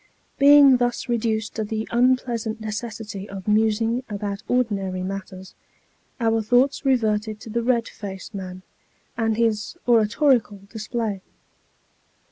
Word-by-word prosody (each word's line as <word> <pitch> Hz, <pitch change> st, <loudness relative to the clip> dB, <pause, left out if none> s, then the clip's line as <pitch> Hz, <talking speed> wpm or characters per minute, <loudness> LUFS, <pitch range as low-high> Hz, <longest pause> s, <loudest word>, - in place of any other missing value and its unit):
Being 280 Hz, -2 st, +8 dB
thus 245 Hz, -1 st, -1 dB
reduced 220 Hz, -2 st, -1 dB
to 220 Hz, -, -2 dB
the 220 Hz, +1 st, -4 dB
unpleasant 240 Hz, -2 st, +1 dB
necessity 215 Hz, -2 st, -6 dB
of 195 Hz, 0 st, -8 dB
musing 225 Hz, +3 st, +2 dB
about 200 Hz, -1 st, -4 dB
ordinary 195 Hz, -7 st, -1 dB
matters, 190 Hz, -1 st, -7 dB, 0.7 s
our 225 Hz, -1 st, +2 dB
thoughts 245 Hz, +7 st, +2 dB
reverted 220 Hz, -5 st, +1 dB
to 220 Hz, -, -9 dB
the 235 Hz, +2 st, 0 dB
red 235 Hz, -1 st, +1 dB
faced 195 Hz, +1 st, -8 dB
man, 185 Hz, -2 st, -7 dB, 0.5 s
and 225 Hz, -2 st, 0 dB
his 225 Hz, +5 st, 0 dB
oratorical 230 Hz, -2 st, +3 dB
display. 220 Hz, -2 st, -3 dB
220 Hz, 115 wpm, -23 LUFS, 205-240 Hz, 0.7 s, Being